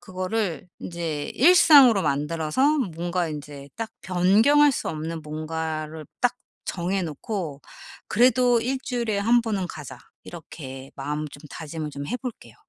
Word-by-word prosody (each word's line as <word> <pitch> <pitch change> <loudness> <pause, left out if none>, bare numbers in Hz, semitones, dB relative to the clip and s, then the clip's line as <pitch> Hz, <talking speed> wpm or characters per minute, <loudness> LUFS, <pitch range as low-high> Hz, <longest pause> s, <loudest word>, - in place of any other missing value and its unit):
그거를 185 -2 -3
인제 165 -4 -4
일상으로 280 - +7
만들어서 160 - +1 0.2
뭔가 175 +1 -1
인제 145 -2 -8
딱 225 -1 -4
변경할 215 +12 +4
수 - - -3
없는 160 +1 -4
뭔가를 155 0 -4
딱 245 0 +2 0.3
정해 185 +2 -2
놓고 160 -1 -4 0.5
'그래도 245 0 +4
1 260 +3 -1
주일에 235 -6 -1
1 230 +4 +4
번은 205 -5 -2
가자.' 145 -5 -8 0.3
이렇게 135 -5 -9
마음 150 +2 -3
좀 145 +1 -13
다짐을 155 -1 -6
좀 140 0 -6
해 245 - -2
볼게요. 250 -3 -8
175 Hz, 265 characters per minute, -25 LUFS, 155-230 Hz, 0.5 s, 일상으로